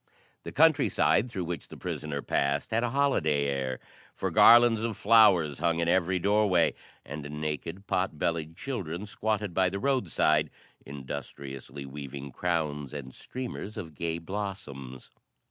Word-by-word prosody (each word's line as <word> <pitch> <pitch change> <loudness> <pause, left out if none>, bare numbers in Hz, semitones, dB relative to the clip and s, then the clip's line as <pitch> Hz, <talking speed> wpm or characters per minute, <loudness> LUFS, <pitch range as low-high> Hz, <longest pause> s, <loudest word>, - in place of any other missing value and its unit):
The - - -7
country 155 -1 +4
side 125 - +2
through 95 -6 -4
which 85 0 -5
the - - -11
prisoner 75 -2 -4
passed 70 +8 0
had 115 +2 +1
a 120 - 0
holiday 90 - +1
air, 65 -2 -2 0.4
for - - -2
garlands 120 -1 +7
of 115 -1 -2
flowers 95 -10 +5
hung 85 -1 +1
in 85 0 0
every 90 +1 +2
doorway, 100 -2 +3 0.3
and 75 0 -7
naked, 80 +5 -4
pot 90 -4 -1
bellied 80 +1 -2
children 100 - -4
squatted 105 -2 -2
by 95 +1 +3
the 100 - -4
roadside, 130 - +1 0.3
industriously 70 0 -7
weaving 70 0 -7
crowns 75 -3 -2
and 65 -3 -7
streamers 125 -4 -7
of 85 -7 -6
gay 80 +2 -3
blossoms. 85 -9 -6
85 Hz, 145 wpm, -28 LUFS, 70-105 Hz, 0.4 s, garlands